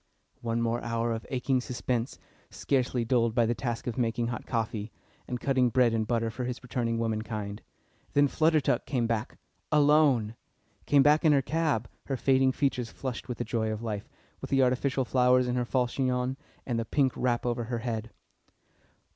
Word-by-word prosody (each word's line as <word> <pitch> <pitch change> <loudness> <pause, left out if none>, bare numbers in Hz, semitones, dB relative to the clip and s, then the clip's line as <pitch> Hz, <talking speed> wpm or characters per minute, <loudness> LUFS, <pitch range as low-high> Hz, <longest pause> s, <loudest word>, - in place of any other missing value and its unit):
One 115 0 -1
more 115 +1 0
hour 115 0 -1
of 115 0 -6
aching 130 0 0
suspense, 125 -1 -3 0.3
scarcely 125 -3 0
dulled 115 -1 +2
by 120 -2 +4
the 115 - +1
task 120 -1 -4
of 120 0 -3
making 115 0 0
hot 125 - -5
coffee, 115 -2 -2 0.4
and 125 - -3
cutting 130 -2 +2
bread 120 -1 +3
and 110 -1 0
butter 115 -1 0
for 125 +2 -4
his 125 +1 -5
returning 115 -2 -1
womankind; 110 -2 -3 0.5
then 145 0 +5
Flutter 160 +2 +3
Duck 140 - 0
came 125 -5 0
back. 115 -1 -2 0.3
Alone! 145 -7 +4 0.5
Came 140 -1 +5
back 150 +3 +4
in 155 -2 +5
her 140 -2 +3
cab, 155 -7 0 0.2
her 135 - -2
fading 130 +1 +3
features 130 -4 -1
flushed 130 -1 -6
with 120 - -3
the - - -2
joy 110 -1 -1
of 110 +1 -5
life, 105 -3 -4 0.3
with - - -6
the 135 -1 +4
artificial 130 +1 +1
flowers 125 0 +3
in 125 - 0
her 125 -1 0
false 125 0 0
chignon, 130 -1 0 0.3
and 120 -3 -1
the - - 0
pink 135 +1 +1
wrap 120 -1 0
over 120 -1 -1
her 120 +1 -3
head. 115 -1 -3
125 Hz, 185 wpm, -28 LUFS, 115-130 Hz, 0.5 s, then